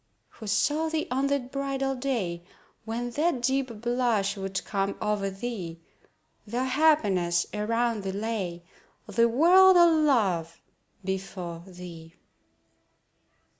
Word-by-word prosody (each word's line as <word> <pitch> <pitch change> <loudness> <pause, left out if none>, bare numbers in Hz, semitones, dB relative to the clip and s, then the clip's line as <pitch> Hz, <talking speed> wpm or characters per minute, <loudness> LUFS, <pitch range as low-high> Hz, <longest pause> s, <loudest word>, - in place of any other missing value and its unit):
Who 220 - -11
saw 295 +11 +1
thee 315 -1 -2
on 265 +2 +1
that 275 -2 -1
bridal 275 -1 -1
day, 235 -11 -2 0.4
When 240 +2 -3
that 295 -1 0
deep 260 -4 -1
blush 240 -5 +1
would 195 -1 -4
come 200 -1 -2
o'er 205 -2 -1
thee, 195 -5 -6 0.7
Though 240 +4 -1
happiness 215 - +2
around 230 +1 0
thee 195 -1 -3
lay, 195 -4 -3 0.4
The 230 +3 +2
world 360 +9 +6
all 340 -2 +6
love 195 - +1 0.5
before 185 -3 -4
thee. 175 -2 -11
225 Hz, 115 wpm, -27 LUFS, 190-270 Hz, 0.7 s, world